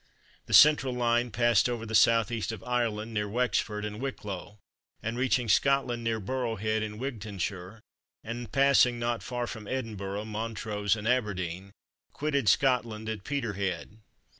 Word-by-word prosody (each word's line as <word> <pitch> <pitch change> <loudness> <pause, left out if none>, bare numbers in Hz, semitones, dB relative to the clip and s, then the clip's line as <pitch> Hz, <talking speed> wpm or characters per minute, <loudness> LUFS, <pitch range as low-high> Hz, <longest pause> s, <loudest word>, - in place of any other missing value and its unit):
The - - -5
central 145 -4 +6
line 120 0 +1
passed 120 0 +3
over 120 -2 -3
the 110 - -8
S.E. 115 0 +3
of 100 - -14
Ireland, 115 -3 -1
near 105 -1 -1
Wexford 110 -2 0
and 105 +2 -6
Wicklow, 105 -6 -6 0.5
and 115 +1 -2
reaching 125 -1 +1
Scotland 125 +1 +2
near 115 -1 0
Burrow 120 +2 -2
Head 110 +1 -1
in 105 0 -4
Wigtownshire, 105 -5 -5 0.4
and 120 -1 -6
passing 135 -3 +4
not 120 0 -1
far 120 -1 -3
from 110 -3 -8
Edinburgh, 105 -5 -4
Montrose 110 -1 -2
and 110 0 -5
Aberdeen, 100 -6 -1 0.4
quitted 140 -6 +1
Scotland 115 -3 +1
at 110 -3 -5
Peterhead. 105 -7 -3
115 Hz, 140 wpm, -29 LUFS, 105-125 Hz, 0.5 s, central